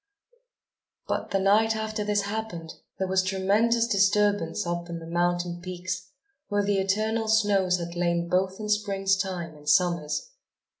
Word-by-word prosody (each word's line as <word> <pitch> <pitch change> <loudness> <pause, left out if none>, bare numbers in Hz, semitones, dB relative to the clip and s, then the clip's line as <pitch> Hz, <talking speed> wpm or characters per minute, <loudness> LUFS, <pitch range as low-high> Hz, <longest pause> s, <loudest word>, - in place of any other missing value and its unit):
But, - - -2
the 195 - +1
night 215 +3 +3
after 220 -1 -3
this 205 -1 +1
happened, 200 -6 -5 0.2
there 190 - -1
was 190 0 +2
tremendous 205 +5 +2
disturbance 205 -4 +2
up 175 0 -3
on 170 - -4
the 165 - -9
mountain 175 +1 -1
peaks, 185 +2 -5 0.4
where 205 -1 +1
the 200 -1 +1
eternal 215 +3 0
snows 200 -4 +3
had 170 -1 -5
lain 170 0 0
both 185 +2 0
in 215 - -4
Spring's 200 -2 +1
time 180 -4 -4
and 150 0 -6
Summer's. 175 - +1
190 Hz, 150 wpm, -26 LUFS, 175-210 Hz, 0.4 s, night